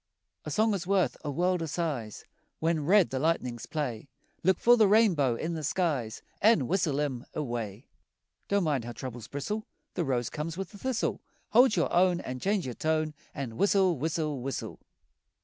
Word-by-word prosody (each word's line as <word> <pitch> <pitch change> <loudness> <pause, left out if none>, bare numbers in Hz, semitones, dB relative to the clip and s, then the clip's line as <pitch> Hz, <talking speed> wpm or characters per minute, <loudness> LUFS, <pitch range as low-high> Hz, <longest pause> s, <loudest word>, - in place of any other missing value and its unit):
A - - -4
song 220 0 +2
is 180 -3 -3
worth 195 -2 +2
a 150 - -3
world 180 +4 +1
o' 165 - -2
sighs. 145 - -3 0.3
When 160 -2 0
red 195 -1 +5
the 130 - -1
lightnings 125 -6 -1
play, 140 -5 -3 0.3
Look 185 +1 +3
for 240 +1 +6
the 220 -3 +5
rainbow 185 - +4
in 160 +8 -3
the 160 -2 -4
skies 140 -9 -1 0.2
An' 210 - +5
whistle 160 -6 +1
'em 135 -5 -2
away. 120 -5 -4 0.6
Don't 200 -1 +2
mind 145 -7 0
how 120 +1 -6
troubles 120 -1 -7
bristle, 210 +12 -4 0.3
The 175 - -1
rose 125 -5 -1
comes 160 +2 -4
with 195 -2 -5
the 205 - -12
thistle. 260 -1 -1 0.3
Hold 245 +1 +5
your 170 - 0
own 180 0 +4
An' 130 0 -5
change 200 +4 0
your 125 - -4
tone 155 +2 0 0.2
An' 125 -6 -5
whistle, 195 -3 +3
whistle, 155 -1 -2
whistle! 135 +2 -5
160 Hz, 180 wpm, -29 LUFS, 130-190 Hz, 0.6 s, for